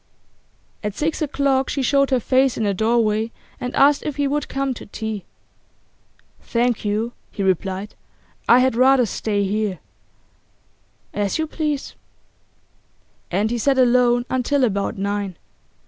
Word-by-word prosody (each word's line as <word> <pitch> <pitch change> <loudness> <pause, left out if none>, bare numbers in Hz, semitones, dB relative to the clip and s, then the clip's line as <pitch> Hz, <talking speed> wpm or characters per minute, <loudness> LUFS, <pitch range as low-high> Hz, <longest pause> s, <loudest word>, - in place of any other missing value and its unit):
At 210 -1 -3
six 315 +2 -1
o'clock 275 -2 +1
she 275 - -1
showed 275 +2 +3
her 260 -2 +2
face 260 +2 +2
in - - -1
the 200 -1 +1
doorway 220 +1 +1 0.3
and 250 0 -4
asked 285 +1 +5
if 300 - -4
he 285 0 0
would 290 +1 -1
come 275 -1 -1
to - - -10
tea. 215 -1 -5 1.2
'Thank 240 -1 0
you,' 215 +3 -1 0.2
he 200 - -3
replied, 190 +2 -1 0.6
'I 240 - +8
had 260 -2 +2
rather 255 0 +5
stay 205 -1 -1
here.' 205 -1 -1 1.4
'As 205 -1 -1
you 315 - 0
please.' 300 -3 -3 1.4
And 205 +5 0
he 240 - -1
sat 270 +3 +2
alone 245 -1 +4
until 260 +2 +1
about 200 -5 0
nine. 200 -2 -2
240 Hz, 140 wpm, -21 LUFS, 210-270 Hz, 1.4 s, I